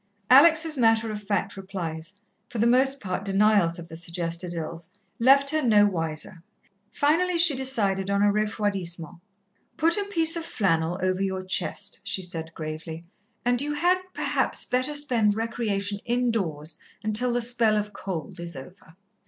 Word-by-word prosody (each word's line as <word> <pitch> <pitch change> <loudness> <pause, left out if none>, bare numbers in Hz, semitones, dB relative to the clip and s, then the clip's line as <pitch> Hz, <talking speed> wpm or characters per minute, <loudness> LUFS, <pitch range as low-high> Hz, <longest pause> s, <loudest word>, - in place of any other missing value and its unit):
Alex' 315 +3 +6
matter 225 -2 +3
of 210 -1 -5
fact 205 0 -2
replies, 180 -4 -6 0.4
for 240 - -7
the 225 - +2
most 265 +3 +3
part 190 -2 -4
denials 200 -3 +3
of 170 -1 -9
the 160 - -10
suggested 170 +1 -5
ills, 165 +1 -6 0.3
left 275 +3 +5
her 310 0 +1
no 215 -6 +5
wiser. 165 -3 -3 0.5
Finally 340 +5 +2
she 335 -4 +5
decided 205 -8 -1
on 200 0 +2
a 205 0 +4
refroidissement. 195 -6 -2 0.6
"Put 330 +3 +2
a 405 - -1
piece 330 -5 +2
of 335 - -3
flannel 175 - 0
over 185 0 0
your 190 -1 -2
chest," 195 +2 -2
she 200 -1 -3
said 165 -2 -5
gravely, 160 +1 -6 0.4
"and 245 0 +2
you 295 +1 -2
had, 350 +5 +2
perhaps, - - -1
better 255 +4 -1
spend 240 -8 +2
recreation 210 -3 -2
indoors 195 -11 -1 0.2
until 215 +4 +1
the 240 0 0
spell 230 -3 +2
of 210 0 -3
cold 175 -6 -6
is 170 -2 -7
over." 165 +4 -12
205 Hz, 155 wpm, -26 LUFS, 175-250 Hz, 0.6 s, Alex